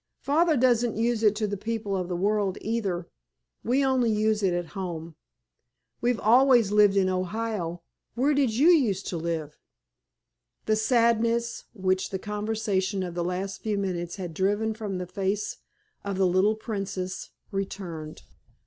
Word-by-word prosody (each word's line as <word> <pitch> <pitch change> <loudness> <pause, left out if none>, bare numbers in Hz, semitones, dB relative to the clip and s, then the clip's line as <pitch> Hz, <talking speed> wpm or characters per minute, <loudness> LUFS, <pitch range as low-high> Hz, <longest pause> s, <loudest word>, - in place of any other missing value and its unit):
Father 315 +2 +3
doesn't 240 -3 +2
use 230 0 +1
it 215 -2 +4
to 210 -2 -2
people 215 -1 -3
of 180 -2 -2
the 180 - -3
world, 200 +1 0
either; 200 -6 -2 0.6
we 265 +4 +2
only 260 -3 +2
use 215 0 +1
it 190 -2 +2
at 175 -1 -2
home. 170 -4 -5 0.9
We've 240 -1 +1
always 240 -2 +5
lived 205 -1 +5
in 190 -1 +3
Ohio. 185 -2 -2 0.3
Where 270 +5 +2
did 275 -4 +2
you 290 +8 +5
used 230 - +3
to 175 - -3
live?" 160 -2 -4 1.1
The 215 - +2
sadness 230 +1 +1
which 185 -3 0
the 190 - -3
conversation 205 -2 -1
of 175 -2 -5
the 175 0 -2
last 185 +2 -3
few 215 -2 -1
minutes 175 -3 -3
had 180 -4 -6
driven 205 +5 0
from 210 -3 -4
the 180 - -4
face 195 +3 -2 0.5
of 200 -1 -3
the 190 - +3
little 185 +4 +3
"Princess" 195 -4 -4 0.2
returned. 185 -6 -5
205 Hz, 150 wpm, -27 LUFS, 185-225 Hz, 1.1 s, always